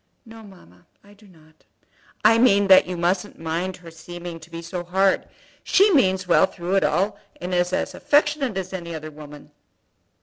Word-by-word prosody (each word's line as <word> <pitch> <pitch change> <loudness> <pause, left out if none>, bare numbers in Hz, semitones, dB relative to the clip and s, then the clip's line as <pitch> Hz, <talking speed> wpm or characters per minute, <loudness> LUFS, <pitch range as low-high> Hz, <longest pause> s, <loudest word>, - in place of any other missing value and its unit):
"No, 225 0 -13
mamma; 180 - -18 0.2
I 205 0 -19
do 205 +1 -21
not." 160 -3 -23 0.6
"I 225 +1 +6
mean 200 -5 +4
that 190 -1 +7
you 180 -1 -5
mustn't 180 +4 -1
mind 165 +3 -4
her 170 -2 -13
seeming 170 +1 -9
to 160 +1 -15
be 165 0 -8
so 175 +1 -5
hard. 190 +2 +1 0.4
She 400 +1 +4
means 190 - +2
well 180 +2 +4
through 180 -1 -5
it - - +2
all, 200 +3 0 0.2
and 180 +1 -5
is 180 0 +1
as - - -2
affectionate 290 -6 +1
as 190 0 -5
any 170 -3 -6
other 155 0 -8
woman." 150 0 -13
180 Hz, 180 wpm, -22 LUFS, 170-200 Hz, 0.6 s, that